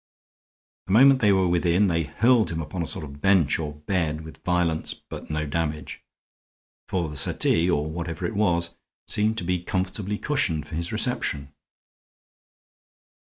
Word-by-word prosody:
The 95 Hz, -, -1 dB
moment 135 Hz, +4 st, +7 dB
they 105 Hz, -2 st, +5 dB
were 95 Hz, -1 st, +3 dB
within 90 Hz, +3 st, +3 dB
they 85 Hz, -4 st, +1 dB
hurled 115 Hz, -, +3 dB
him 80 Hz, -, -3 dB
upon 80 Hz, +3 st, -4 dB
a 85 Hz, -, -2 dB
sort 85 Hz, -5 st, -3 dB
of 70 Hz, 0 st, -11 dB
bench 95 Hz, -8 st, +3 dB
or 75 Hz, -2 st, -4 dB
bed 80 Hz, -2 st, -1 dB
with 80 Hz, 0 st, -12 dB
violence, 90 Hz, -3 st, 0 dB
but -, -, -10 dB
no 75 Hz, 0 st, -1 dB
damage; 75 Hz, 0 st, -3 dB, 0.9 s
for 90 Hz, -3 st, 0 dB
the 75 Hz, -, -7 dB
settee, 80 Hz, +4 st, +2 dB
or 75 Hz, -4 st, +1 dB
whatever 85 Hz, +1 st, -4 dB
it -, -, -2 dB
was, 85 Hz, -5 st, +1 dB, 0.3 s
seemed 110 Hz, +2 st, +1 dB
to -, -, -3 dB
be 90 Hz, 0 st, -1 dB
comfortably 95 Hz, +3 st, -2 dB
cushioned 110 Hz, -, 0 dB
for -, -, -11 dB
his 85 Hz, +2 st, -3 dB
reception. 110 Hz, -, -1 dB
85 Hz, 160 wpm, -25 LUFS, 80-100 Hz, 0.9 s, moment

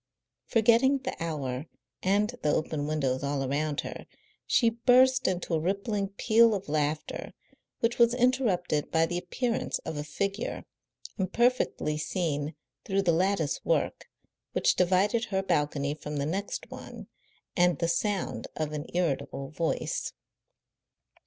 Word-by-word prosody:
Forgetting 235 Hz, +4 st, +4 dB
the 255 Hz, -, -3 dB
hour 140 Hz, -3 st, -3 dB, 0.3 s
and 205 Hz, +4 st, +2 dB
the 150 Hz, -, +2 dB
open 150 Hz, -1 st, -1 dB
windows 135 Hz, -4 st, 0 dB
all 140 Hz, -1 st, -1 dB
around 145 Hz, +2 st, -1 dB
her, -, -, -8 dB, 0.4 s
she 230 Hz, -2 st, +4 dB
burst 255 Hz, +2 st, +4 dB
into 180 Hz, -2 st, -1 dB
a 160 Hz, -, +3 dB
rippling 200 Hz, +4 st, -1 dB
peal 220 Hz, +3 st, +4 dB
of 195 Hz, -, -5 dB
laughter, 150 Hz, 0 st, -2 dB, 0.5 s
which 235 Hz, +1 st, +1 dB
was 235 Hz, 0 st, +5 dB
interrupted 230 Hz, -, +1 dB
by 165 Hz, 0 st, +3 dB
the 175 Hz, +1 st, -2 dB
appearance 230 Hz, +7 st, -1 dB
of 155 Hz, -, -4 dB
a 145 Hz, -, -2 dB
figure, 195 Hz, +8 st, -3 dB, 0.5 s
imperfectly 190 Hz, -6 st, +1 dB
seen 155 Hz, -3 st, -2 dB, 0.3 s
through 195 Hz, 0 st, 0 dB
the 175 Hz, -, +3 dB
lattice 175 Hz, -3 st, +1 dB
work -, -, 0 dB, 0.4 s
which -, -, +3 dB
divided 190 Hz, +6 st, +2 dB
her 195 Hz, -3 st, -1 dB
balcony 145 Hz, -4 st, 0 dB
from 150 Hz, 0 st, -6 dB
the 140 Hz, -, 0 dB
next 195 Hz, +6 st, -3 dB
one, -, -, -9 dB, 0.5 s
and 175 Hz, -3 st, +3 dB
the 170 Hz, -, 0 dB
sound 195 Hz, +3 st, -1 dB
of 155 Hz, -1 st, -2 dB
an 150 Hz, +1 st, -4 dB
irritable 140 Hz, -4 st, -1 dB
voice. 165 Hz, +1 st, -2 dB
180 Hz, 135 wpm, -28 LUFS, 150-215 Hz, 0.5 s, was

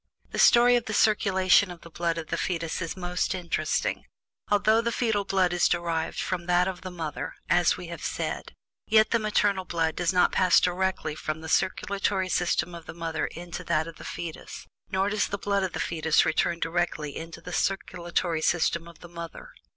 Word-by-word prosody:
The -, -, -4 dB
story 245 Hz, +1 st, +7 dB
of 240 Hz, -, 0 dB
the 215 Hz, -, -3 dB
circulation 195 Hz, -3 st, +4 dB
of 175 Hz, -1 st, -9 dB
the 170 Hz, -, -13 dB
blood 170 Hz, +1 st, -1 dB
of 165 Hz, -1 st, -6 dB
the -, -, 0 dB
fetus 165 Hz, -1 st, -2 dB
is 170 Hz, +1 st, -4 dB
most 180 Hz, +1 st, -1 dB
interesting. 175 Hz, -2 st, -1 dB, 0.4 s
Although 215 Hz, +2 st, +4 dB
the 235 Hz, 0 st, -1 dB
fetal 220 Hz, -4 st, 0 dB
blood 185 Hz, -2 st, +2 dB
is 175 Hz, -, +3 dB
derived 170 Hz, -2 st, -1 dB
from 180 Hz, -2 st, -3 dB
that 180 Hz, +1 st, +3 dB
of 190 Hz, -2 st, -4 dB
the 185 Hz, -, -6 dB
mother, 165 Hz, -4 st, -5 dB, 0.2 s
as 175 Hz, 0 st, +4 dB
we 180 Hz, -, -7 dB
have 170 Hz, -, -7 dB
said, -, -, -4 dB, 0.3 s
yet 215 Hz, 0 st, +4 dB
the 230 Hz, -, +3 dB
maternal 205 Hz, -3 st, +1 dB
blood 165 Hz, -3 st, -1 dB
does 175 Hz, -1 st, +1 dB
not 180 Hz, -1 st, +3 dB
pass 185 Hz, -, +5 dB
directly 185 Hz, -2 st, -1 dB
from 155 Hz, +1 st, -4 dB
the 160 Hz, -, -7 dB
circulatory 195 Hz, +1 st, 0 dB
system 175 Hz, 0 st, 0 dB
of 170 Hz, -1 st, -10 dB
the 160 Hz, -, -8 dB
mother 165 Hz, -1 st, -2 dB
into 175 Hz, +1 st, -7 dB
that 160 Hz, -1 st, +1 dB
of 165 Hz, -, -10 dB
the -, -, -11 dB
fetus; 165 Hz, -2 st, -7 dB, 0.2 s
nor 190 Hz, 0 st, +1 dB
does 205 Hz, 0 st, +1 dB
the 200 Hz, -, -3 dB
blood 200 Hz, 0 st, 0 dB
of 190 Hz, -2 st, -2 dB
the -, -, -4 dB
fetus 160 Hz, -1 st, +2 dB
return 170 Hz, +2 st, +1 dB
directly 165 Hz, -4 st, -2 dB
into 165 Hz, 0 st, -7 dB
the 180 Hz, -, -9 dB
circulatory 175 Hz, -2 st, -1 dB
system 170 Hz, 0 st, +1 dB
of 170 Hz, -, -15 dB
the 175 Hz, -, -10 dB
mother. 170 Hz, -, -9 dB
175 Hz, 195 wpm, -27 LUFS, 165-195 Hz, 0.4 s, story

